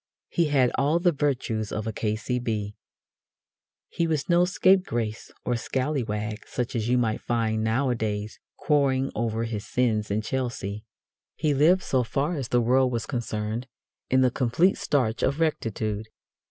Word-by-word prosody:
He 170 - +2
had 135 -5 +3
all 145 +4 +3
the 175 0 +3
virtues 125 -7 -1
of 110 - -3
a 110 - -3
K.C.B. 110 -1 -2 1.1
He 170 - -1
was 155 -4 -1
no 175 0 +4
scapegrace 180 - +1
or 125 - +1
scallywag 115 -5 -2
such 125 0 -3
as 115 0 -1
you 125 - +3
might 115 -3 0
find 110 -2 0
nowadays 110 -3 -1 0.2
crowing 135 -3 +2
over 115 0 -1
his 110 -3 -3
sins 110 -4 +1
in 105 +2 0
Chelsea. 110 -4 -3 0.5
He 155 -2 +1
lived, 165 +7 +4
so 130 -2 +1
far 140 +8 -1
as 135 -5 -3
the 120 +1 +2
world 130 +2 +3
was 115 -2 -2
concerned, 115 -1 -3 0.4
in 130 0 +4
the 130 -1 +4
complete 130 +10 +2
starch 125 -6 0
of 140 +3 +1
rectitude. 110 -8 -1
120 Hz, 150 wpm, -26 LUFS, 110-140 Hz, 1.1 s, no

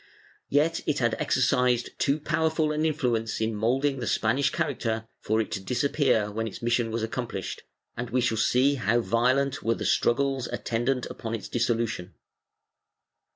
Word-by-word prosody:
Yet 155 +4 +2
it 150 - +1
had 120 -4 +1
exercised 125 -2 +2
too 140 +2 +2
powerful 160 0 +1
an 155 +1 +1
influence 120 -8 -1
in 110 0 0
moulding 130 +6 +1
the 120 - -3
Spanish 125 +5 +2
character 115 -9 -2
for 110 +1 0
it 110 - -2
to - - -2
disappear 125 -2 +1
when 115 +2 -2
its 110 - -7
mission 120 -1 +1
was 115 0 -2
accomplished, 115 -4 -4 0.3
and 125 0 -4
we 125 - +1
shall 120 -2 +1
see 130 +5 +3
how 120 -2 +1
violent 130 +4 +1
were 115 0 +1
the - - -5
struggles 135 +1 +1
attendant 120 +2 -1
upon 115 0 -5
its 105 -4 -6
dissolution. 115 -7 -1
120 Hz, 155 wpm, -27 LUFS, 115-140 Hz, 0.3 s, see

